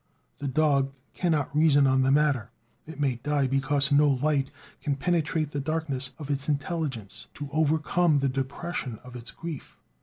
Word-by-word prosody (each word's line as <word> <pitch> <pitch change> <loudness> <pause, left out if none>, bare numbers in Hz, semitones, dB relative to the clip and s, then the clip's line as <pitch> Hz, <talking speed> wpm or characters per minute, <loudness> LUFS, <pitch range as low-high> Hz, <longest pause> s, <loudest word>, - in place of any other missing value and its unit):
The 145 - -3
dog 140 -1 +2 0.2
cannot 155 -6 0
reason 150 -2 +5
on 130 0 +3
the 130 - +3
matter; 140 -5 +2 0.4
it 160 -1 -9
may 135 -4 +1
die 145 +2 0
because 135 +1 +1
no 145 +1 +5
light 140 0 +1 0.3
can 145 -2 0
penetrate 155 0 0
the 145 - -2
darkness 140 -3 -2
of 145 -2 -5
its 140 +1 -1
intelligence 145 - -3
to 145 -1 -6
overcome 155 +1 +2
the 140 0 +2
depression 135 -1 -3
of 125 0 -11
its 120 -1 -7
grief. 165 -4 -8
145 Hz, 160 wpm, -27 LUFS, 135-155 Hz, 0.4 s, reason